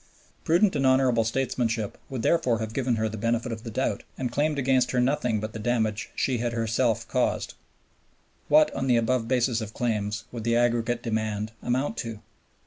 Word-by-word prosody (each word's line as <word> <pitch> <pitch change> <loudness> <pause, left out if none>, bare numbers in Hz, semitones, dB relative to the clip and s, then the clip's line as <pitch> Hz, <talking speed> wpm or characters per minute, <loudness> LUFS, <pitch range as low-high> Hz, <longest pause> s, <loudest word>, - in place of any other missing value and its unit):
Prudent 180 +4 +3
and 140 - +1
honorable 130 -3 +4
statesmanship 115 -3 -1
would 130 -4 -4
therefore 130 -9 +2
have 110 0 -4
given 125 -2 0
her 110 0 0
the 110 0 -6
benefit 120 +2 0
of 110 -1 -5
the 115 - -6
doubt, 130 +4 -1 0.2
and 125 -2 -2
claimed 150 +4 0
against 130 -2 +2
her 125 - 0
nothing 125 -3 +1
but 110 +1 -5
the 110 - -6
damage 110 -2 -1
she 130 -3 0
had 120 0 -1
herself 115 0 0
caused. - - 0 0.9
What, 150 +1 +5
on 135 - -2
the 125 -2 +4
above 115 0 +1
basis 125 -2 +1
of 110 -1 -7
claims, 105 -4 -1
would 115 -2 -6
the 115 +1 +1
aggregate 120 0 +1
demand 110 -2 -2
amount 130 - -1
to? 115 -3 -5
120 Hz, 185 wpm, -26 LUFS, 110-130 Hz, 0.9 s, What